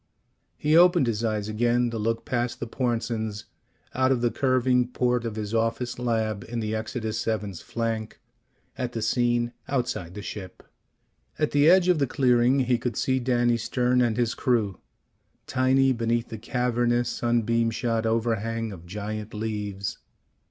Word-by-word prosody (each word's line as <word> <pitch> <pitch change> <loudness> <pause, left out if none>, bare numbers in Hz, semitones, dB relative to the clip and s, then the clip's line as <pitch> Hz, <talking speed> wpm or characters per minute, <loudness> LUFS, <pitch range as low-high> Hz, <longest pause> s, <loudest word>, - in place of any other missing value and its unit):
He 150 +1 +2
opened 175 -3 +6
his 115 -1 -1
eyes 105 -2 -1
again 120 +2 +1
to 115 - -3
look 115 +2 -1
past 120 -1 -2
the - - -3
Pornsens, 115 -3 -2 0.5
out 130 0 +2
of 125 -3 +1
the 120 -1 +2
curving 130 -2 +2
port 125 -1 0
of 115 -2 -3
his 105 0 -4
office 115 +2 -1
lab 110 -4 -1
in 120 +1 -4
the 110 -1 -2
Exodus 110 0 -3
VII's 105 -5 -3
flank, 115 -2 -3 0.6
at 125 -1 -2
the 115 - -3
scene 120 0 +1
outside 120 -10 -2
the 105 - -6
ship. 95 -4 -8 0.7
At 150 - 0
the 145 +2 +5
edge 180 0 +5
of 180 -4 +3
the 140 - +2
clearing 125 +1 +3
he 125 -2 +1
could 120 -2 -3
see 130 0 +1
Danny 120 -1 +2
Stern 125 +2 +1
and 120 -2 +1
his 120 -2 +1
crew, 110 -7 0 0.7
tiny 130 +1 +3
beneath 115 0 -1
the 110 - -6
cavernous 120 0 0
sunbeam 115 -1 +1
shot 115 0 -1
overhang 115 0 -1
of 85 -3 -11
giant 105 +3 -5
leaves. 105 -2 -4
120 Hz, 160 wpm, -26 LUFS, 110-125 Hz, 0.7 s, opened